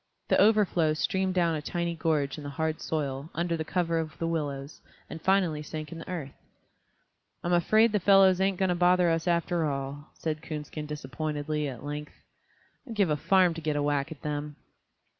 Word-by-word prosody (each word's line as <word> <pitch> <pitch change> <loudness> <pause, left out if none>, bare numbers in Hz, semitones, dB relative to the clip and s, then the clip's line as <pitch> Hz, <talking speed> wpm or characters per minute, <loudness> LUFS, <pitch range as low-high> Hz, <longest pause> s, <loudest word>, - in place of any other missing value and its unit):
The - - +4
overflow 195 -7 +3
streamed 190 +3 0
down 170 -2 +2
a 155 - -2
tiny 170 +2 -2
gorge 155 -2 0
in - - -8
the 145 - -5
hard 160 +2 -2
soil, 140 -2 -3
under 170 +1 0
cover 170 0 0
of 155 -3 -5
the 165 - -2
willows, 145 -3 -3 0.3
and 160 - -7
finally 185 -5 +2
sank 155 +1 -6
in 165 - -7
the - - -9
earth. 155 -7 -5 1.1
"I'm 175 - 0
afraid 215 +6 +4
the 210 - +2
fellows 190 -1 +5
ain't 195 -1 +2
going 190 0 +1
to - - +3
bother 175 0 +4
us 165 +1 -1
after 170 0 +1
all," 140 +1 -4
said 155 -1 -3
Coonskin 150 -1 -6
disappointedly, 150 +1 -3
at 130 -3 -7
length. 150 +1 -5 0.7
"I'd 230 - -6
give 200 -6 +2
a - - +3
farm 185 +2 +3
to 165 - -7
get 155 -1 -1
a 145 - 0
whack 145 -1 0
at 155 - -10
them." 150 0 -3
160 Hz, 190 wpm, -28 LUFS, 150-175 Hz, 1.1 s, fellows